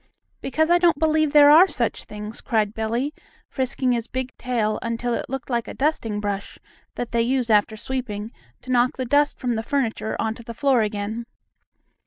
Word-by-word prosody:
"Because 315 +4 0
I 350 - +5
don't 345 -4 +4
believe 310 -1 +2
there 290 0 +8
are 335 +5 +8
such - - -1
things!" 210 +1 -8
cried 215 -2 0
Billie, 230 +7 -2 0.3
frisking 260 -1 -1
his 235 -1 -1
big 260 0 -4
tail 230 -4 -1
until 230 +1 -2
it - - -3
looked 270 -1 -5
like 235 -1 -1
a - - -7
dusting 250 -8 -1
brush 205 -1 -4 0.4
that 245 - -4
they 235 - +2
use 245 0 0
after 215 +1 +3
sweeping 225 -3 -4 0.3
to 255 - -6
knock 245 0 +2
the 260 - -2
dust 285 +3 +2
from 245 -2 -1
the 220 - -1
furniture 230 -3 -2
onto 225 +1 -2
the 235 0 -9
floor 270 -2 +3
again. 215 +2 -3
240 Hz, 185 wpm, -23 LUFS, 220-270 Hz, 0.4 s, there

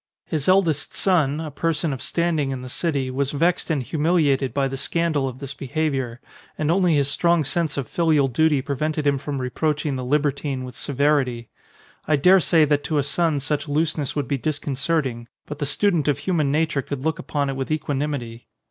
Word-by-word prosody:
His 155 -4 -3
eldest 175 -6 +2
son, 155 -6 +2
a 160 -2 -5
person 160 0 -1
of 130 - -6
standing 170 -5 0
in 130 -1 -4
the 130 - -7
city, 140 -3 -1
was 135 +2 -1
vexed 170 +6 +1
and 150 -5 0
humiliated 150 -3 +1
by 140 -1 0
the 135 - -4
scandal 150 0 0
of 125 - -9
this 140 0 -6
be 140 - -8
haviour; 135 -5 -1 0.4
and 155 +1 0
only 180 -2 +3
his 140 -2 +2
strong 170 +3 +2
sense 155 +1 -1
of 135 -4 -2
filial 155 -3 +2
duty 145 +2 +2
prevented 150 +2 -2
him 140 -1 +2
from 145 0 -4
reproaching 145 +2 -1
the 130 - -4
libertine 140 0 0
with 125 -1 -8
severity. 135 -4 0 0.6
I 155 - +4
daresay 165 0 +5
that 145 -1 +1
to 155 - 0
a 145 - +2
son 155 +1 +1
such 145 +3 -2
looseness 150 -1 -1
would 145 -4 -1
be 140 +1 -1
disconcerting, 140 -3 -2 0.2
but 150 0 -7
the 145 - -1
student 170 -1 +1
of 145 - +2
human 155 -7 0
nature 155 -1 +1
could 135 -1 -6
look 160 +1 -1
upon 140 -2 -2
it - - -5
with 135 0 -4
equanimity. 140 -6 -3
145 Hz, 195 wpm, -23 LUFS, 135-160 Hz, 0.6 s, daresay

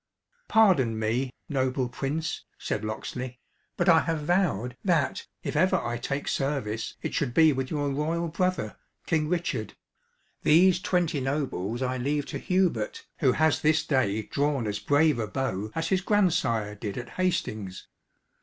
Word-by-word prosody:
"Pardon 175 - +4
me, 115 +4 0 0.2
noble 130 -2 0
Prince," 150 +6 -3
said - - -3
Locksley; 125 +3 -5 0.4
"but - - +1
I 165 -2 +7
have 160 -2 -2
vowed, 145 - +1
that, 170 -6 +1 0.2
if - - -3
ever 185 +5 +4
I 120 0 -3
take 135 +4 -3
service, 130 -6 -2
it - - -3
should 125 -5 -1
be 160 -2 +6
with 130 -1 -3
your 145 -2 -1
royal 160 +4 -1
brother, 170 -9 -1 0.3
King 155 -2 +1
Richard. 175 0 -2 0.7
These 175 +4 +5
twenty 175 -5 +1
nobles 130 -5 -2
I 130 0 -1
leave 145 +3 -1
to - - -2
Hubert, 190 - 0
who 130 -6 +4
has 160 -1 +2
this 155 +1 +3
day 110 -7 +1
drawn 140 0 0
as 105 -1 -2
brave 145 -2 +3
a 110 - -1
bow 105 -4 -2
as 165 0 -1
his 190 -1 +2
grandsire 170 - +1
did 105 0 -5
at 125 - -6
Hastings. 110 - -2
145 Hz, 155 wpm, -27 LUFS, 120-165 Hz, 0.7 s, I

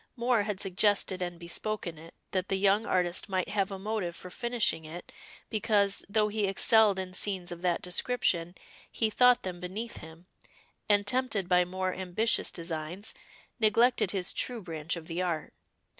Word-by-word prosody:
Moor 240 -2 +2
had 205 -2 -3
suggested 195 -1 +2
and 175 -1 -4
bespoken 170 -1 -3
it, 165 +1 -13 0.2
that 185 -1 -1
the 195 - +1
young 200 +3 +3
artist 180 0 +1
might 185 -2 -1
have 200 -2 0
a 195 - -5
motive 195 -3 -3
for 180 - -10
finishing 235 -8 0
it, 160 +3 -9 0.4
because, 205 -2 +2
though 210 0 +2
he 210 -1 0
excelled 205 +1 +4
in 185 -1 -4
scenes 185 -2 0
of 175 0 -7
that 180 -2 0
description, 180 -3 0 0.4
he 220 -2 0
thought 250 +2 +5
them 180 -2 -5
beneath 200 +6 -5
him, 160 +2 -12 0.6
and 205 -1 +4
tempted 220 -4 0
by 180 0 +4
more 185 +1 -2
ambitious 190 +5 0
designs, 170 +4 -5 0.5
neglected 230 0 +3
his 190 -2 +1
true 240 -4 -1
branch 160 -1 -3
of 165 -2 -8
the 170 +2 -3
art. 170 -4 -2
190 Hz, 165 wpm, -30 LUFS, 175-215 Hz, 0.6 s, thought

